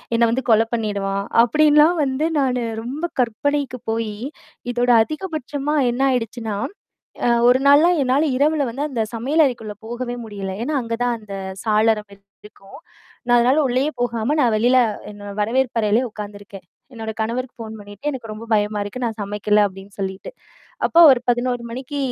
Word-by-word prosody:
என்னை 235 0 +4
வந்து 260 +2 -1
கொலை 225 0 +4
பண்ணிடுவான்" 200 -3 -2 0.2
அப்டின்லாம் 300 +6 +4
வந்து 275 +3 0
நானு 250 -3 0 0.2
ரொம்ப 290 +9 -4
கற்பனைக்கு 255 +2 -1
போயி, 225 -2 -2 0.6
இதோட 245 +1 0
அதிகபட்சமா 300 -2 -4
என்னா 265 +3 +1
ஆயிடுச்சுன்னா, 225 -2 -3 0.7
அ 240 - +3 0.2
1 255 +1 +4
நாள்லாம் 325 +5 +6
என்னால 265 +4 +2
இரவில 295 +1 +2
வந்து 275 +5 -4
அந்த 240 -5 -2
சமையல் 285 +8 +2
அறைக்குள்ள 225 -5 -6
போகவே 240 +1 -4
முடியல. 200 -3 -6
ஏன்னா, 300 +5 -2
அங்க 230 0 -3
தான் 240 -1 +1
அந்த 210 -2 -10 0.3
சாளரம் 215 -1 +2 0.4
இருக்கும். 200 +3 -14 0.5
நான் 240 0 +5
அதனால 255 +6 +3
உள்ளேயே 260 +5 0
போகாம, 235 +4 0
நான் 240 -4 +3
வெளில 245 +4 +3 0.4
என்னோ 205 0 -11
வரவேற்பு 240 +3 0
அறையிலயே 220 +4 +2
உக்காந்துருக்கேன். 205 -2 -9 0.3
என்னோட 220 -1 -5
கணவருக்கு 240 +3 -3
ஃபோன் 220 -1 -7
பண்ணீட்டு 205 +6 -9
எனக்கு 245 -5 -7
ரொம்ப 215 +2 -8
பயமா 210 0 +1
இருக்கு. 205 +5 -7
நான் 225 -2 -3
சமைக்கல 210 +1 +1
அப்டின்னு 195 +1 -13
சொல்லீட்டு. 190 - -4 0.6
அப்போ 335 - +3
ஒரு 255 - +3
11:00 245 0 0
மணிக்கு 260 +4 -6
235 Hz, 155 wpm, -21 LUFS, 215-265 Hz, 0.7 s, நாள்லாம்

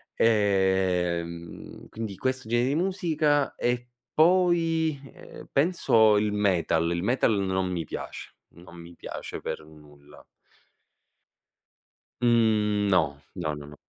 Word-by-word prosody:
Ehm, 95 -5 0
quindi 110 -4 -6
questo 130 -3 -3
gene 120 +1 +2
di 140 - 0
musica 160 -6 0
e 125 0 -1 0.3
poi, 165 -3 +2
ehm, - - -13
penso 115 - +4
il 105 0 +1
metal, 85 -5 +1
il 85 0 -1
metal 120 +2 +2
non 95 -1 -1
mi 85 -2 -3
piace, - - -8
non 85 +1 -16
mi 85 +1 -12
piace - - -7
per - - -5
nulla. 75 -1 -17 2.0
Mhmm, 110 -3 +2
no, 75 -7 +1 0.2
no, 80 -4 -3
no, 75 -1 -9
no. 75 - -12
105 Hz, 115 wpm, -26 LUFS, 85-130 Hz, 2.0 s, penso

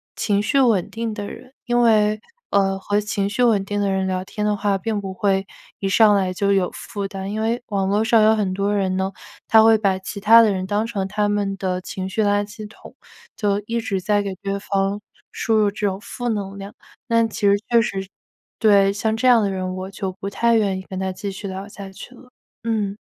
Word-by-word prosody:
情 205 -1 +1
绪 275 +7 +1
稳 225 -9 +3
定 225 -1 -4
的 205 -1 -5
人， 255 +1 -12
因 240 0 +2
为， 215 -2 +3 0.3
呃， 195 -1 +1
和 205 +2 0
情 210 -1 -2
绪 230 +4 0
稳 220 -5 +3
定 205 +1 -3
的 200 -1 +1
人 190 0 0
聊 185 0 -2
天 210 - -5
的 210 - +1
话， 200 -1 +1
并 220 -1 -2
不 195 -1 -5
会 195 0 0 0.3
一 195 - -3
上 210 +1 +5
来 185 -2 0
就 200 +2 0
有 190 -2 +2
负 200 -1 -5
担。 195 0 -6
因 215 - -2
为 230 +2 0
网 195 -3 -1
络 205 +2 +2
上 225 -1 +4
有 220 +1 +5
很 195 -4 -1
多 200 +1 0
人 190 -2 0
呢， 190 +1 -1 0.4
他 220 - +7
会 225 0 +6
把 195 -3 +1
其 195 +2 -7
他 225 +3 +7
的 220 -3 +4
人， 185 -1 -2
当 210 +3 -1
成 195 -4 -3
他 205 +1 0
们 205 -1 -1
的 185 -2 -2
情 190 +1 -5
绪 215 +3 0
垃 205 0 +2
圾 210 +1 -9
桶， 220 - -15 0.4
就 205 -1 0
一 235 0 -1
直 200 -5 -2
在 205 +1 +1
给 195 - -4
对 200 0 -2
方 195 0 -1 0.3
输 225 - -1
入 210 -1 +4
这 205 +1 -4
种 190 -1 -3
负 245 +2 -6
能 200 -2 -3
量， 195 +1 -8 0.3
但 230 -1 +2
其 - - -8
实 200 0 +5
确 235 -1 +5
实 195 -5 -3 0.5
对， 200 -2 +4
像 220 +2 -1
这 250 +3 +1
样 240 -3 +6
的 200 - 0
人， 185 -1 -3
我 185 +1 -6
就 190 -1 -4
不 195 - -5
太 235 +3 +2
愿 200 -4 +1
意 - - -9
跟 190 - -5
他 190 0 -2
继 195 +2 -5
续 195 +1 -7
聊 190 +1 -6
下 200 -1 -9
去 245 +6 -11
了， 250 +1 -17 0.3
嗯。 210 -3 -1
205 Hz, 250 characters per minute, -21 LUFS, 195-220 Hz, 0.5 s, 他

